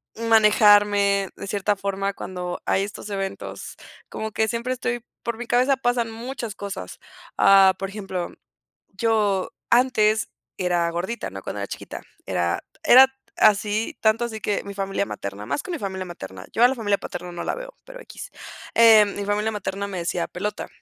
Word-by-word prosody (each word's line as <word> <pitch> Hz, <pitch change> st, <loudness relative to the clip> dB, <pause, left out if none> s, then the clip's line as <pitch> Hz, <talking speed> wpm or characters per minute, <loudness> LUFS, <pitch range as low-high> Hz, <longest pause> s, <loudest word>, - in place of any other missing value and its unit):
manejarme 205 Hz, -3 st, +4 dB
de -, -, -8 dB
cierta 205 Hz, +1 st, 0 dB
forma 195 Hz, 0 st, -2 dB
cuando 180 Hz, -2 st, -5 dB
hay 190 Hz, -, +2 dB
estos 205 Hz, +1 st, -7 dB
eventos. 195 Hz, -1 st, -5 dB, 0.3 s
Como 220 Hz, 0 st, -5 dB
que 220 Hz, +1 st, +1 dB
siempre 235 Hz, +3 st, -2 dB
estoy 240 Hz, -1 st, -3 dB, 0.2 s
por 235 Hz, -1 st, -3 dB
mi 240 Hz, 0 st, -6 dB
cabeza 255 Hz, +3 st, +3 dB
pasan 245 Hz, -3 st, 0 dB
muchas 235 Hz, -1 st, -6 dB
cosas, 200 Hz, -, -7 dB, 0.4 s
ah, 195 Hz, -1 st, +7 dB
por 195 Hz, 0 st, -4 dB
ejemplo, 195 Hz, -3 st, -4 dB, 0.6 s
yo 205 Hz, -2 st, +1 dB, 0.2 s
antes 225 Hz, -3 st, +3 dB, 0.3 s
era 175 Hz, -2 st, +1 dB
gordita, 190 Hz, +7 st, -4 dB
¿no?, 95 Hz, -, -7 dB
cuando -, -, -5 dB
era -, -, -3 dB
chiquita. -, -, -8 dB, 0.2 s
Era 85 Hz, 0 st, -1 dB, 0.2 s
era 265 Hz, -3 st, +9 dB, 0.3 s
así, 210 Hz, +1 st, +2 dB
tanto 225 Hz, +2 st, +3 dB
así 220 Hz, -2 st, -7 dB
que 205 Hz, 0 st, -1 dB
mi 200 Hz, -, -7 dB
familia 195 Hz, 0 st, -2 dB
materna 100 Hz, -, -6 dB
más 280 Hz, -, -2 dB
que -, -, -9 dB
mi 345 Hz, -, -3 dB
familia 190 Hz, -4 st, -4 dB
materna, 95 Hz, -, -9 dB
yo 230 Hz, -, 0 dB
a 245 Hz, -, +8 dB
la 265 Hz, -, -1 dB
familia 205 Hz, -5 st, 0 dB
paterna 175 Hz, 0 st, -7 dB
no 175 Hz, -, -5 dB
la -, -, -1 dB
veo, -, -, -8 dB
pero -, -, -11 dB
x, -, -, -10 dB, 0.4 s
eh, 225 Hz, -2 st, +7 dB
mi 205 Hz, 0 st, -4 dB
familia 210 Hz, +2 st, 0 dB
materna 200 Hz, -1 st, -4 dB
me 200 Hz, -2 st, -6 dB
decía 170 Hz, 0 st, -2 dB
pelota. 205 Hz, +4 st, -4 dB
205 Hz, 175 wpm, -23 LUFS, 195-230 Hz, 0.6 s, era